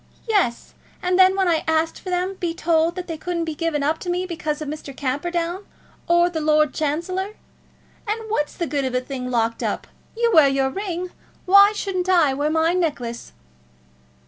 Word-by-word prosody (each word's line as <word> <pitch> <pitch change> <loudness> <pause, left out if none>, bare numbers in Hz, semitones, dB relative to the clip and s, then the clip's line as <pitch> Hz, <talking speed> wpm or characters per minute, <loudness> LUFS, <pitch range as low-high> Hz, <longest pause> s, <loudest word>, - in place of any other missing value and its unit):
"Yes; 390 - 0 0.3
and 360 +1 +1
then 375 0 +6
when 385 -1 +1
I 330 -2 +2
asked 320 0 +1
for 370 - -7
them 365 +1 -1
be 345 -3 -3
told 330 0 +1
that 365 -1 -5
they 325 -3 -6
couldn't 340 -1 -2
be 320 - -3
given 305 -2 -1
up 310 +3 0
to 360 - -6
me, 360 +1 -1
because 315 -4 -3
of 305 - -5
Mr. 285 -2 -7
Camperdown 340 +7 -2 0.4
or 345 0 +4
the 330 -3 -3
Lord 305 -2 +3
Chancellor. 365 +7 -2 0.7
And 430 +2 -1
what's 295 -9 -1
the 340 - -2
good 285 -2 -1
of 260 -1 -2
a 250 - +1
thing 255 -1 -5
locked 230 -2 0
up? - - -2 0.3
You 470 0 +2
wear 310 -4 +7
your 270 0 +1
ring; 365 0 -4 0.3
why 400 +2 +7
shouldn't 375 -3 -2
I 335 -7 +4
wear 290 +3 0
my 320 +2 +2
necklace?" 285 -10 -2
330 Hz, 190 wpm, -22 LUFS, 295-365 Hz, 0.7 s, wear